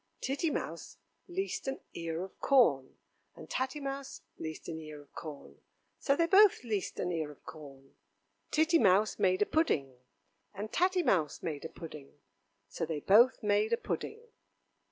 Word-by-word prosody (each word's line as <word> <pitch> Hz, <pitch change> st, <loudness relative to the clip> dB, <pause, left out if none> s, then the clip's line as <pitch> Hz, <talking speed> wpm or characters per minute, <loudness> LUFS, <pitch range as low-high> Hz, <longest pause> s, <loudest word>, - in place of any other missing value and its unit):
Titty 280 Hz, +5 st, -1 dB
Mouse -, -, -5 dB, 0.3 s
leased 380 Hz, -4 st, -3 dB
an 270 Hz, -, -2 dB
ear 165 Hz, +1 st, -3 dB
of 190 Hz, -, -11 dB
corn, 185 Hz, -, +3 dB, 0.4 s
and -, -, -11 dB
Tatty 260 Hz, +3 st, -2 dB
Mouse 275 Hz, -1 st, -6 dB, 0.2 s
leased 160 Hz, 0 st, -6 dB
an 160 Hz, -1 st, -5 dB
ear 155 Hz, -1 st, -9 dB
of 145 Hz, -1 st, -18 dB
corn, 140 Hz, -, -9 dB, 0.4 s
So 275 Hz, -, +2 dB
they 335 Hz, -, +3 dB
both 395 Hz, 0 st, +6 dB
leased 215 Hz, -5 st, -2 dB
an 180 Hz, -, -1 dB
ear 160 Hz, -3 st, -2 dB
of 145 Hz, -, -15 dB
corn. 135 Hz, -3 st, -12 dB, 0.6 s
Titty 320 Hz, +2 st, +3 dB
Mouse 205 Hz, 0 st, +3 dB
made 185 Hz, +1 st, +3 dB
a -, -, -2 dB
pudding, 140 Hz, -, 0 dB, 0.6 s
and 210 Hz, +2 st, -5 dB
Tatty 365 Hz, 0 st, +2 dB
Mouse 160 Hz, -, +1 dB
made 155 Hz, -3 st, -4 dB
a -, -, -4 dB
pudding, 150 Hz, -4 st, -10 dB, 0.5 s
So 100 Hz, -, -5 dB
they 160 Hz, -2 st, -2 dB
both 235 Hz, -, +5 dB
made 210 Hz, +2 st, +2 dB
a -, -, +3 dB
pudding. 445 Hz, -, -4 dB
195 Hz, 160 wpm, -32 LUFS, -, 0.6 s, both